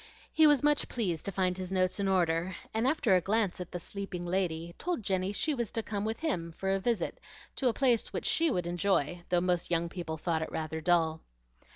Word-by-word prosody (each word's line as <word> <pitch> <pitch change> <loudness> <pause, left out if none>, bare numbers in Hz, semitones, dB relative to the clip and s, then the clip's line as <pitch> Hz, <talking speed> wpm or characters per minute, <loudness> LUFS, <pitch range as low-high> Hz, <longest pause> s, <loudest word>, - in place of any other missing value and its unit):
He 315 -1 +6
was 295 -2 +4
much 295 0 +2
pleased 180 -10 -2
to 200 - 0
find 185 -1 0
his 185 0 -5
notes 185 +1 +1
in 200 - +1
order, 175 -1 +1 0.2
and 225 +3 +1
after 265 -8 +3
a 180 - +3
glance 200 -1 0
at 180 - -7
the 180 - -4
sleeping 185 -1 -6
lady, 170 -2 -1
told 350 -10 -2
Jenny 190 0 0
she 300 +9 0
was 235 -6 -2
to 225 - -1
come 205 -1 -3
with 220 +4 -3
him 170 - -2
for 190 +3 -2
a 195 - +2
visit 230 +3 -1 0.4
to 265 - +1
a - - +5
place 245 -4 +2
which - - -4
SHE 330 0 +3
would 180 - -1
enjoy, 175 -2 0
though 175 -1 +3
most 180 -1 0
young 170 0 +1
people 170 -3 -5
thought 160 0 -1
it 160 - -4
rather 160 0 -3
dull. 160 -2 +2
185 Hz, 225 wpm, -30 LUFS, 170-220 Hz, 0.4 s, He